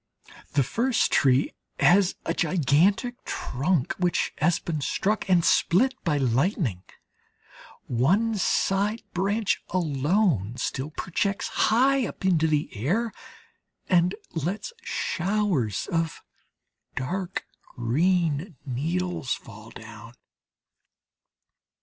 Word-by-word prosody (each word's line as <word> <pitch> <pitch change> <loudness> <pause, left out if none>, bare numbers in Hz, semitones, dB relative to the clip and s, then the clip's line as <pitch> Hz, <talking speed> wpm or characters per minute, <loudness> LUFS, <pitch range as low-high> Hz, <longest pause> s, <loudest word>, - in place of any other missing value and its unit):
The 140 - +3
first 235 - +1
tree 135 -2 +3 0.3
has 195 +1 +4
a - - 0
gigantic 180 - +1
trunk 140 +2 -1
which 180 -1 0
has 170 +2 +3
been 155 -3 -4
struck 200 +7 -1
and 175 -2 +4
split 250 +10 +3
by 155 -4 +1
lightning; 135 - 0 1.0
one 190 - +2
side 200 +3 +1
branch 200 +4 0
alone 150 - +1
still 135 +3 -3
projects 195 +5 -2
high 260 +2 +3
up - - -8
into 165 -4 +3
the 150 -3 -1
air, 195 - 0 0.8
and 180 0 +3 0.2
lets 180 - -3
showers 185 - -1
of 165 -1 -1 0.7
dark 180 +8 -3 0.3
green 160 - 0
needles 155 +1 -2
fall 110 0 -13
down. 115 +1 -12
175 Hz, 95 wpm, -26 LUFS, 135-195 Hz, 1.0 s, has